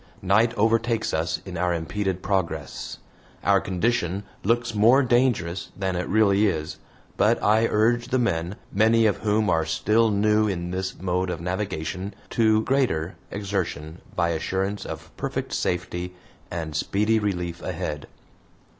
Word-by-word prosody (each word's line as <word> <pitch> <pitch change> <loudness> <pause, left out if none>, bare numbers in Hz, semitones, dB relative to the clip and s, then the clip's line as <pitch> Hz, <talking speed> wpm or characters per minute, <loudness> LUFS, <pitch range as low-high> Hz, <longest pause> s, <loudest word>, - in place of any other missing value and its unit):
Night 110 +5 +4
overtakes 115 +1 +1
us 80 +2 -1
in 90 -3 -6
our 90 0 +1
impeded 95 +3 -2
progress. 85 -7 -2 0.5
Our - - +4
condition 100 -1 0 0.2
looks 120 +2 +1
more 115 +6 +5
dangerous 120 -9 +1
than 95 -2 -1
it 90 0 -2
really 105 0 +4
is, 80 -3 -3 0.4
but - - +3
I 110 +2 +4
urge 120 +3 +2
the 130 - +1
men, 95 -6 0 0.2
many 110 +3 +4
of 105 - +2
whom 105 0 +1
are 80 -3 +2
still 105 +8 +2
new 105 +1 +3
in 90 -3 -3
this 95 +1 -3
mode 90 0 -1
of - - -3
navigation, 95 +1 -3 0.2
to 110 -1 +3
greater 110 - 0
exertion 95 -6 -3
by 85 - +2
assurance 95 +5 -2
of - - -8
perfect - - -3
safety 90 0 -2 0.3
and 80 -3 -4
speedy 105 +7 +1
relief 90 -5 -2
ahead. 75 -1 -4
95 Hz, 140 wpm, -25 LUFS, 85-110 Hz, 0.5 s, more